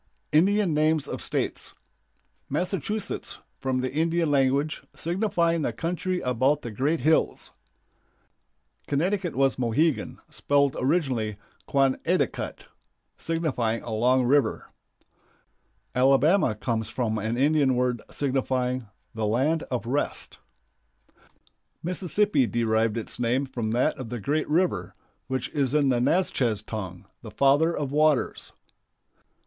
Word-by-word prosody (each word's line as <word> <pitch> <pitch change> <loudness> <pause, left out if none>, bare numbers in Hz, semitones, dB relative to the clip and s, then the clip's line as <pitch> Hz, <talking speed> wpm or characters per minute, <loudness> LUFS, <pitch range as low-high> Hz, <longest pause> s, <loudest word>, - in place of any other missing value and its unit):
INDIAN 190 +3 +3
NAMES 155 -1 +2
OF - - -5
STATES. - - -3 0.7
Massachusetts, 185 +6 -2 0.2
from 130 -1 -1
the 130 0 -3
Indian 165 +1 +1
language, 140 +2 +1
signifying 170 -2 0
the 130 - 0
"country 180 +7 -2
about 130 +4 +1
the 120 - -5
great 140 +8 0
hills." 155 +4 +1 1.4
Connecticut 175 +4 0
was 135 0 +2
Mohegan, 130 +6 0
spelled 140 -1 +1
originally 130 - 0 0.3
"Quon 135 -1 +2
eh 180 +2 +2
ta 140 - +3
cut," - - -7 0.5
signifying 130 -9 -1
"a 120 - -6
long 125 +4 +3
river." 140 +3 +1 1.2
Alabama 135 - +4
comes 110 0 -2
from 110 -3 -1
an 110 +3 -2
Indian 140 -1 +3
word 125 -2 0
signifying 130 -3 -1 0.3
"the 110 -2 -1
land 140 +9 +1
of 125 -2 -2
rest." 140 +5 -2 1.4
Mississippi 185 - +1
derived 115 -1 +1
its 115 - -5
name 125 +3 +1
from 120 -4 -4
that 120 +4 +1
of 125 -4 -6
the 120 0 -4
great 150 +9 -1
river, 150 - 0 0.3
which 130 -2 -2
is 140 -2 0
in 145 -2 +3
the 120 -2 +2
Natchez 125 - +1
tongue 95 -6 -6 0.2
"The - - -9
Father 145 +5 +3
of 140 -2 -2
Waters." 150 -2 +1
135 Hz, 120 wpm, -26 LUFS, 120-160 Hz, 1.4 s, Alabama